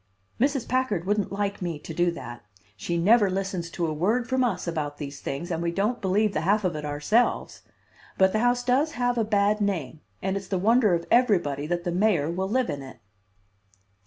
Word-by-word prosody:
"Mrs. 275 0 +1
Packard 240 -9 0
wouldn't 205 0 0
like 200 0 -2
me 170 -3 -3
to 160 - -9
do 175 +2 +2
that. 120 -8 -7 0.3
She 170 +8 -3
never 205 +4 +4
listens 185 -2 -3
to 170 0 -2
a 155 - -1
word 215 +10 0
from 260 0 +1
us 235 -7 -1
about 150 -3 -3
these 140 -2 -7
things, 170 +6 -4
and 165 0 -2
we 170 0 0
don't 210 +7 -1
believe 200 +2 +1
the 155 - -1
half 205 +5 +2
of 180 -4 0
it 150 - -5
ourselves; 150 +12 0 0.6
but 190 0 +4
the 215 - +2
house 245 +1 +2
does 270 +6 +1
have 245 -1 0
a - - +3
bad 210 0 +1
name, 160 -8 -2 0.2
and 190 0 -2
it's 195 -1 -5
the 190 - -1
wonder 215 0 +4
of 170 - -4
everybody 175 - +2
that 175 +1 -2
the 175 - -2
mayor 175 -5 +2
will 190 +2 -2
live 250 -3 +1
in 145 -1 -5
it." 130 -2 -11
190 Hz, 210 wpm, -26 LUFS, 170-220 Hz, 0.6 s, never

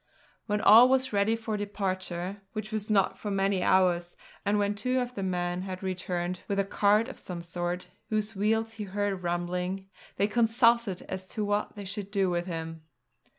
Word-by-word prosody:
When 210 -1 0
all 225 +4 +9
was 260 -2 +2
ready 200 +3 +3
for 225 -1 -3
departure 190 -2 -3
which 215 0 -5
was 215 -1 -3
not 195 -2 +2
for 210 - -4
many 195 -1 +1
hours, 175 -2 +2 0.3
and 205 +1 +2
when 205 0 +1
two 255 +5 0
of 250 0 -3
the 200 - -4
men 180 -1 -1
had 185 0 -6
returned 180 -1 -2
with 200 - -1
a 195 - +3
cart 205 +3 +3
of - - -9
some 175 -2 -6
sort, 175 +1 -3 0.2
whose 215 0 -1
wheels 220 +3 +1
he 215 -2 -5
heard 200 -1 -2
rumbling 180 +2 -2 0.2
they 200 - +2
consulted 230 -3 +3
as 185 0 -6
to 215 - -2
what 205 +1 -1
they 205 -1 -7
should 195 +1 -5
do 195 -3 +1
with 175 +1 -1
him. 165 -2 -5
195 Hz, 185 wpm, -29 LUFS, 180-215 Hz, 0.3 s, all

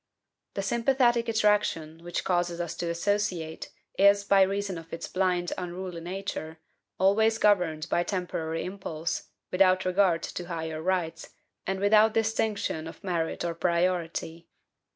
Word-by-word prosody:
The 195 - -2
sympathetic 240 +1 +2
attraction, 205 -7 +1
which 175 0 -3
causes 175 -1 0
us 170 -2 -3
to 170 - -2
associate, 170 -2 -1 0.3
is, 200 +1 +6
by 200 -1 +4
reason 195 -1 0
of 165 0 -14
its 165 - -5
blind, 180 -2 0
unruly 180 -1 -5
nature, 175 -3 -5 0.4
always 220 +4 +3
governed 180 -8 +2
by 170 - +1
temporary 175 -3 -3
impulse, 175 -4 -4 0.2
without 185 0 +4
regard 185 -2 +2
to 175 - -5
higher 160 -2 -4
rights, 165 -2 -2 0.3
and 190 0 -1
without 215 +2 +5
distinction 220 -7 0
of 165 - -11
merit 170 -3 -2
or 170 - -1
priority. 170 -1 -1
180 Hz, 130 wpm, -28 LUFS, 165-200 Hz, 0.4 s, is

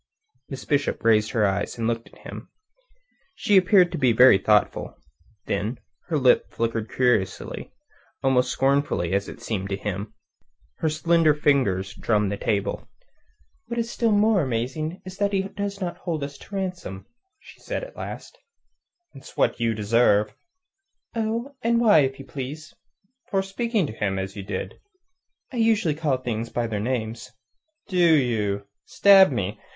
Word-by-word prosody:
Miss 135 -2 -7
Bishop 145 -1 0
raised 110 -1 +4
her 110 -3 +1
eyes, 100 +3 -1
and 115 - -2
looked 115 0 -2
at - - -19
him. - - -9 0.9
She 205 - +1
appeared 185 -1 +5
to 170 - -4
be 125 -4 +3
very 125 -3 +7
thoughtful. 105 +1 +1 0.5
Then 105 +5 -2 0.3
her 165 -3 0
lip 130 -3 +3
flickered 115 -1 -2
curiously, 120 -7 -1 0.5
almost 130 -1 +3
scornfully, 135 -10 +1
it 100 0 -2
seemed 100 -3 -3
to 100 - -1
him. 100 +1 -5 0.6
Her 160 - 0
slender 160 0 +3
fingers 105 -11 +1
drummed 105 -3 0
the 100 - -3
table. 100 -2 -2 0.8
"What 235 +1 -5
is 230 0 -2
still 230 -2 +1
more 210 -1 +3
amazing 135 +7 -3
is 185 0 -9
that 200 0 0
he 190 -1 +1
does 200 0 -4
not 175 -3 -4
hold 160 -5 -3
us 140 0 -6
to 200 - -10
ransom," 180 - -5 0.5
said - - -4
she - - -5
at - - -18
last. - - -8 0.7
"It's 135 - -14
what - - +1
you 115 -1 0
deserve." 105 -1 +2 0.8
"Oh, 230 +5 -2
and 230 0 +2
why, 215 -8 +6
if 135 -2 +1
you 135 - -10
please?" 145 +4 -7 0.6
"For 195 -1 +1
speaking 215 0 -1
to 125 - -6
him 100 -3 -2
as 95 0 -4
you 100 - -5
did." 95 -1 -5 0.7
"I - - -4
usually 220 -8 +2
call 150 -3 0
things 115 -2 -4
by 120 - -2
their 110 -3 -3
names." 115 0 -3 0.6
"Do 185 - -3 0.2
you? 105 -7 0 0.2
Stab 195 -4 +6
me! 105 -3 -3
130 Hz, 155 wpm, -24 LUFS, -, 0.9 s, very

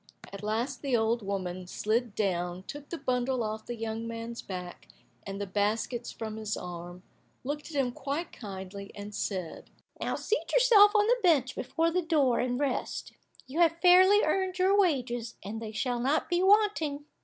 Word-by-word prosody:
At 200 - -7
last 230 +5 -2
the 270 -4 +1
old 225 +1 +1
woman 185 -2 -4
slid 220 +3 -1
down, 180 -3 -1
took 290 +6 -9
the 340 - -4
bundle 250 -2 0
off 215 0 -4
the 240 - -4
young 225 0 -4
man's 230 0 -5
back, 180 -2 -7 0.4
and 195 0 -5
the 200 - -2
baskets 215 +5 -1
from 220 -1 -6
his 215 -1 -3
arm, 175 0 -8 0.4
looked 290 +4 -4
at 290 -3 -2
him 250 -2 +1
quite 280 +7 -4
kindly, 195 -2 -8
and 205 0 -8
said, 185 -5 -4 0.3
"Now - - -1
seat 455 - -2
yourself 440 -4 +7
on 415 0 +5
the - - +3
bench 305 - +3
before 325 +6 0
the 365 +2 +1
door, 300 -7 +2
and 245 0 0
rest. 280 -3 -2 0.3
You 275 +6 -5
have 335 -1 +4
fairly 375 +4 +7
earned 375 -1 0
your 380 +2 +4
wages, 250 - +1
and 215 +4 -5
they 220 -1 -5
shall 245 +3 -1
not 275 +8 0
be 350 0 +3
wanting." 380 -8 +3
245 Hz, 180 wpm, -29 LUFS, 210-325 Hz, 0.4 s, yourself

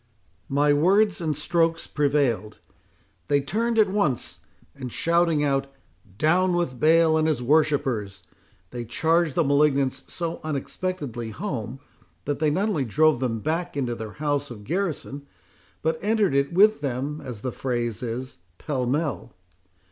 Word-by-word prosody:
My 145 +1 +3
words 195 +7 +3
and 155 -4 -1
strokes 165 +1 +1
prevailed; 135 -8 0 0.7
they 145 -1 +3
turned 225 +11 -1
at 215 -2 +5
once, 160 - -1 0.3
and 130 -3 -7
shouting 170 -1 +2
out, 135 -1 +1 0.5
Down 180 - +3
with 150 -8 -2
Baal 160 +1 +5
and 155 - +2
his 150 -6 0
worshippers! 135 - +1 0.5
they 120 - -5
charged 160 +6 +1
the 170 - +3
malignants 140 -2 +2
so 170 -1 -4
unexpectedly 145 -5 -4
home, 130 - -5 0.4
that 145 -1 -2
they 155 -1 +2
not 195 +8 0
only 155 -10 0
drove 150 +4 +3
them 115 -4 -2
back 165 +2 -2
into 125 -4 -1
their 110 -2 -7
house 145 -1 -1
of 110 -4 -9
garrison, 150 - -3 0.6
but 160 0 0
entered 210 -5 +2
it 140 0 +1
with 205 0 +4
them, 140 +2 -3
as 120 -5 -7
the 130 - -3
phrase 120 -3 -3
is, 125 +2 -5 0.2
pell 130 -4 -2
mell. 145 -3 -2
145 Hz, 145 wpm, -25 LUFS, 130-165 Hz, 0.7 s, at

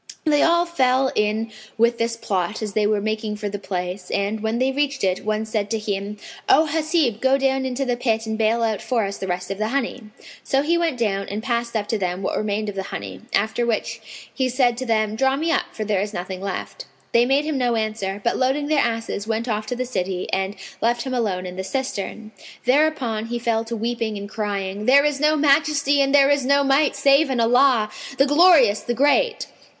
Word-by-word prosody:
They 295 -2 +3
all 340 +1 +4
fell 265 -5 +2
in 215 +2 0 0.3
with 235 +1 +2
this 230 0 -1
plot 195 0 -2
as 210 -2 -4
they 210 0 +2
were 210 -1 +1
making 215 0 -2
for 210 0 -4
the 205 0 -5
place; 180 -1 -5
and, 200 +2 -1
when 220 +2 -1
they 260 +2 +1
reached 280 -2 -1
it, 185 -1 0
one 215 +1 -1
said 215 -2 -2
to 225 - 0
him, 205 -1 -4 0.3
"O 315 - +6
Hasib, 310 -7 0
go 265 +1 +3
down 265 -1 0
into 260 +2 -2
the 245 -1 0
pit 225 -2 -1
and 220 0 -3
bale 225 +1 +1
out 220 -2 -1
for 235 -5 0
us 200 0 -5
the 190 - -4
rest 180 +1 -3
of 195 - -5
the 215 - 0
honey." 255 -1 -2 0.4
So 270 +1 +1
he 335 +3 +2
went 335 -6 0
down 200 -4 -1
and 210 +2 -4
passed 235 -2 -2
up 210 -2 -1
to 220 - 0
them 180 0 -2
what - - -1
remained 215 0 -2
of 205 - -3
the 195 - -3
honey, 95 -2 -7
after 220 +3 0
which 230 0 -2 0.3
he 260 -2 0
said 245 -1 +2
to 260 0 -4
them, 215 -2 +1
"Draw 265 +3 +2
me 320 +4 -1
up, - - +1
for 215 - -5
there 205 -2 0
is 210 +1 -4
nothing 185 +1 -5
left." 200 - -5 0.3
They 235 0 +5
made 275 +3 +2
him 305 -3 -1
no 245 -2 +1
answer; 215 -3 -2
but, 235 - +1
loading 275 +3 0
their 305 -2 +3
asses, 225 -3 -3
went 225 +1 -2
off 215 -2 -2
to 250 - -2
the 255 +1 -2
city 185 -6 -3
and 190 +1 -1 0.3
left 235 +1 +1
him 260 - -4
alone 200 -7 -1
in 180 0 -7
the 190 - -3
cistern. 220 -2 -4 0.3
Thereupon 250 -5 +1
he 240 +1 -3
fell 230 -1 0
to 230 +1 -4
weeping 225 -1 -2
and 200 0 -6
crying, 205 -1 -3
"There 280 +3 +6
is 295 -2 0
no 305 +1 +3
Majesty 285 -1 +3
and 275 - +2
there 280 0 +5
is 285 -1 +2
no 280 +2 +3
Might 275 +2 +2
save 275 +1 +4
in 260 -2 -1
Allah, 235 -2 +3 0.3
the 275 - +5
Glorious, 290 - +5
the 240 - -3
Great!" 290 - +2
230 Hz, 225 wpm, -22 LUFS, 210-270 Hz, 0.4 s, O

